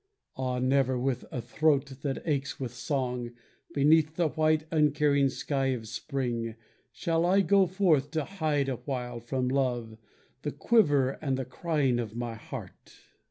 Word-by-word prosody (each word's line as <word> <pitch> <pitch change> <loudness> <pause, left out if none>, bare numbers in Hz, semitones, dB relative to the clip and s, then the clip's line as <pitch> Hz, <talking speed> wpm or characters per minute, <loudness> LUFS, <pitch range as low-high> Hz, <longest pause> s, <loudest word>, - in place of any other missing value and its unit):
Ah, 130 -1 -2
never 130 0 +2
with 125 0 -1
a 125 - -4
throat 140 -3 +1
that 140 -2 -3
aches 140 -3 -1
with 125 -3 -4
song, 125 -1 -2 0.4
Beneath 155 +1 +4
the 170 -2 +2
white 155 +2 +2
uncaring 150 -3 +3
sky 135 0 -1
of 125 -4 -2
spring, 120 -1 -3 0.4
Shall 165 +6 0
I 190 +3 +4
go 195 -1 +4
forth 170 -7 +2
to 155 - 0
hide 155 -7 0
awhile 125 -2 -4
from 125 +2 -2
Love 120 -4 -1 0.4
The 150 - -3
quiver 145 - +3
and 135 -3 0
the 130 - -3
crying 135 -2 0
of 115 -2 -4
my 120 -1 -3
heart. 110 - -9
135 Hz, 150 wpm, -29 LUFS, 125-155 Hz, 0.4 s, Beneath